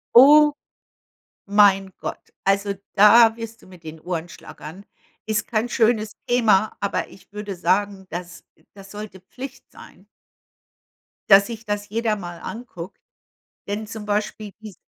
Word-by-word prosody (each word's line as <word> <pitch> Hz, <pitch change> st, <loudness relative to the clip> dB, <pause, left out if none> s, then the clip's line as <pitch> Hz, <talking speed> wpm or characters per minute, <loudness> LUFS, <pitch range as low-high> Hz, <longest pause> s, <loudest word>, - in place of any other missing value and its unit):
O 295 Hz, +4 st, +8 dB, 0.9 s
mein 200 Hz, -1 st, +4 dB
Gott, -, -, -5 dB, 0.2 s
also, 200 Hz, +1 st, +1 dB, 0.2 s
da 225 Hz, +2 st, +7 dB
wirst 230 Hz, -1 st, -8 dB
du -, -, -19 dB
mit 180 Hz, -3 st, -16 dB
den 160 Hz, 0 st, -9 dB
Ohren 170 Hz, 0 st, -4 dB
schlackern. 165 Hz, +3 st, -11 dB, 0.4 s
Ist 215 Hz, 0 st, -1 dB
kein 225 Hz, 0 st, -1 dB
schönes 220 Hz, -3 st, +1 dB
Thema, 220 Hz, -4 st, +3 dB
aber 200 Hz, -, -2 dB
ich 195 Hz, -, -18 dB
würde 210 Hz, -1 st, -6 dB
sagen, 190 Hz, +2 st, 0 dB
das 175 Hz, +1 st, -7 dB, 0.3 s
das 195 Hz, -1 st, -13 dB
sollte 210 Hz, -2 st, -9 dB
Pflicht 260 Hz, +8 st, -10 dB
sein -, -, -16 dB, 1.2 s
dass 200 Hz, 0 st, +7 dB
sich 225 Hz, -1 st, -8 dB
das 205 Hz, 0 st, -3 dB
jeder 225 Hz, 0 st, 0 dB
mal 175 Hz, -4 st, -8 dB
anguckt. 220 Hz, -7 st, -8 dB, 0.7 s
Denn 210 Hz, +2 st, -4 dB
zum 220 Hz, -1 st, -8 dB
Beispiel 210 Hz, 0 st, -2 dB
die 220 Hz, -, -8 dB
s 200 Hz, -, -15 dB
205 Hz, 140 wpm, -22 LUFS, 190-220 Hz, 1.2 s, O